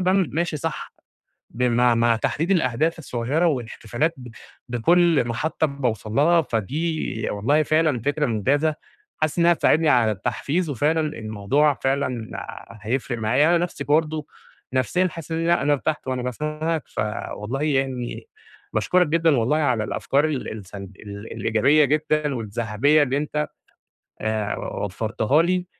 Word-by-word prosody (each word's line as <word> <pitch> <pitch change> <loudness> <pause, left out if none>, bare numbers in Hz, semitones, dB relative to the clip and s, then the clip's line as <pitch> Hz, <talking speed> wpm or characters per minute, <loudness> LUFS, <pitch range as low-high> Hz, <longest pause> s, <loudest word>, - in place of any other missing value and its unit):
باعمل 185 -1 +2
ماشي 165 0 -1
صح، 165 0 -4 0.6
بمع 120 0 +2
مع 115 0 +3
تحديد 160 - -1
الأهداف 165 -2 +1
الصغيّرة 140 +4 -1
والاحتفالات 125 +2 -1
ب 125 -2 -10 0.4
بكلّ 160 +3 +3
محطة 155 +7 0
باوصل 125 -7 -3
لها، 165 +6 +4
فدي 115 -1 -3 0.5
ي - - -2
والله 140 +10 +2
فعلًا 155 -5 +2
فكرة 145 +5 0
ممتازة، 140 +7 +1 0.4
حاسس 155 +1 -1
إنها 170 0 +5
هتساعدني 160 -1 +3
على 120 -6 +4
التحفيز 150 - -2
وفعلًا 150 +6 +1 0.2
الموضوع 110 +8 +1
فعلًا 130 -4 -2 0.5
هيفرق 120 +1 -2
معايا، 125 +8 +3
أنا - - +3
نفْسي 145 -5 -6
برضه 155 0 +1 0.5
نفْسيًا 180 +9 +1
حاسس 165 0 -8
إن 165 +1 -1
لأ 170 -3 +3
أنا 145 +1 +2
ارتحت 150 0 -1
وأنا 130 -1 -1
باسمعك، 155 +5 -2
فوالله 105 +4 -4
يعني 135 - -1 0.4
باشكرك 180 -1 +2
جدًا 165 -2 +3
والله 120 +7 +2
على 125 -8 +1
الأفكار 140 +7 0
ال 150 -4 -2
السلب 100 -2 -9
ال 100 +1 -9
الإيجابية 135 +7 +3
جدًا، 150 0 +1
والذهبية 115 +6 +1
اللي 135 -1 0
أنت 150 +1 -2 0.7
آآ، 110 -1 -1
و - - -4
وفرتها 110 - +1
لي، 180 +1 0
140 Hz, 140 wpm, -23 LUFS, 115-155 Hz, 0.7 s, إنها